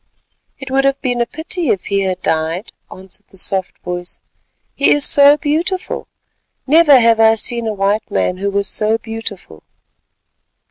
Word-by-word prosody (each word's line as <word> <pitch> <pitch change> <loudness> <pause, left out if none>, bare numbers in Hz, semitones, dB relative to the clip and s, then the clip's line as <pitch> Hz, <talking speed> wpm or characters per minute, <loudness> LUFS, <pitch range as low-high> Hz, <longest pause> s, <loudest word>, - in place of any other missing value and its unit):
"It 265 -1 -9
would 270 0 +2
have 275 0 +1
been 245 -2 -1
a 235 - 0
pity 320 0 -3
if 195 - -1
he 200 0 -1
had 190 -1 -3
died," 160 +5 -2 0.2
answered 190 +2 -12
the 190 - -19
soft 190 0 -1
voice, 175 0 -5 0.5
"he 280 - +2
is 290 -1 +4
so 285 +1 +6
beautiful; 325 +6 -3 0.6
never 295 -1 +5
have 230 -1 +3
I 225 0 +5
seen 235 +1 -2
a 220 - -2
white 200 +2 -1
man 185 -2 -1
who 200 +2 -2
was 200 0 -1
so 215 +3 +1
beautiful." 225 - -8
225 Hz, 165 wpm, -16 LUFS, 195-275 Hz, 0.6 s, so